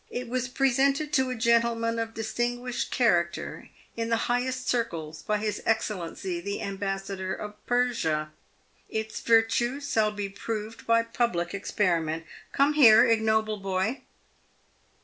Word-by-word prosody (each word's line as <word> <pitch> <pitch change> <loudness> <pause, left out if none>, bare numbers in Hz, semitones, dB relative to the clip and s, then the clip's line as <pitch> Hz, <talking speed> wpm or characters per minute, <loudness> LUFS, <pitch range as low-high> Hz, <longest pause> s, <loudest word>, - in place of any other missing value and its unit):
It 250 0 -5
was 255 0 -1
presented 275 +3 +1
to 265 -1 +3
a 255 - -2
gentleman 230 0 +2
of 225 0 -4
distinguished 240 +2 -2
character - - 0 0.3
in 230 0 -2
the 230 -1 +1
highest 255 +1 -1
circles 165 -10 -2
by 210 - 0
his 210 0 -3
Excellency 190 -5 -2
the 200 +2 -4
Ambassador 195 -1 -3
of 210 0 -9
Persia. 165 -12 0 0.6
Its 220 0 -3
virtues 240 +5 +2
shall 215 -1 +3
be 205 -1 -4
proved 215 +2 -6
by 230 0 +4
public 230 -7 -1
experiment 165 -5 0 0.3
Come 280 +2 +3
here, 240 -6 +8
ignoble 220 -2 +2
boy! 195 +5 -2
225 Hz, 130 wpm, -27 LUFS, 200-245 Hz, 0.6 s, here